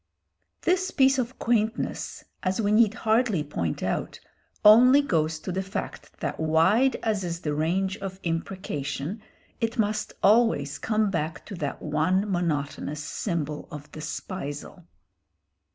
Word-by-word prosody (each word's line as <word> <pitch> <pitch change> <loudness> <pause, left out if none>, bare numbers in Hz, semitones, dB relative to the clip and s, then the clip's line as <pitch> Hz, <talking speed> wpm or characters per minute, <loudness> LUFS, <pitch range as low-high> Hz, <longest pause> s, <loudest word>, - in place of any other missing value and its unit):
This 370 +1 +2
piece 265 -1 +4
of 250 +1 -3
quaintness, 225 -1 -1 0.2
as 185 +2 -1
we 205 -2 +1
need 220 0 +4
hardly 220 -6 +2
point 85 - -3
out, - - -2 0.5
only 250 +7 +8
goes 160 - 0
to 185 - -4
the 190 +2 -1
fact 190 0 -6
that - - -3
wide 165 +12 +3
as 210 -3 0
is 170 -1 -4
the 150 -3 -1
range 185 +6 0
of 190 -1 -6
imprecation, 165 0 -3 0.4
it 230 +1 -1
must 215 -1 0
always 210 -10 +3
come 215 -2 +1
back 160 -2 -3
to 210 - -8
that 145 -3 -4
one 180 +7 +1
monotonous 150 -3 -2
symbol 155 -4 -3
of 150 0 -9
despisal. 155 +1 -6
190 Hz, 135 wpm, -26 LUFS, 155-220 Hz, 0.5 s, only